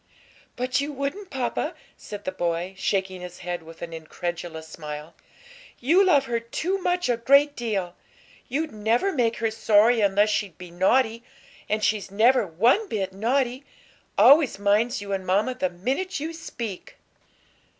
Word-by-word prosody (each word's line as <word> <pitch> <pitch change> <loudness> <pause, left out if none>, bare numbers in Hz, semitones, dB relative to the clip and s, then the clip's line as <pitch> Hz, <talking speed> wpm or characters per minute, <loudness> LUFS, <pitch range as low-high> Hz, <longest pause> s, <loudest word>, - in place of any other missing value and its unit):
"But 255 +2 0
you 290 +1 -3
wouldn't, 285 +8 -4
papa," 260 -2 -2 0.2
said 205 -1 -9
the 185 - -1
boy, 175 0 -2
shaking 190 -1 -1
his 180 0 -8
head 175 -1 -3
with 165 +1 -12
an 165 -1 -6
incredulous 165 0 -6
smile. 150 0 -8 0.6
"You 335 +10 +4
love 290 -8 +4
her 235 -2 -1
too 330 +12 -2
much 360 -1 0
a 240 -2 +1
great 280 +5 +4
deal; 195 -7 -3 0.5
you'd 300 +4 -2
never 225 - +1
make 235 -5 +1
her 225 0 0
sorry 220 +2 +4
unless 205 +1 +3
she'd 200 -5 -2
be 180 -1 -10
naughty; 225 +6 +2 0.5
and 215 0 0
she's 210 -2 0
never 220 +3 +3
one 235 - +2
bit 190 -3 -2
naughty, 250 +5 0 0.5
always 285 -5 +6
minds 205 +2 +1
you 200 0 -4
and 190 -1 -2
mamma 205 +7 +2
the 185 -7 -1
minute 260 - -2
you 320 +3 -4
speak." 235 - -7
220 Hz, 155 wpm, -25 LUFS, 185-265 Hz, 0.6 s, always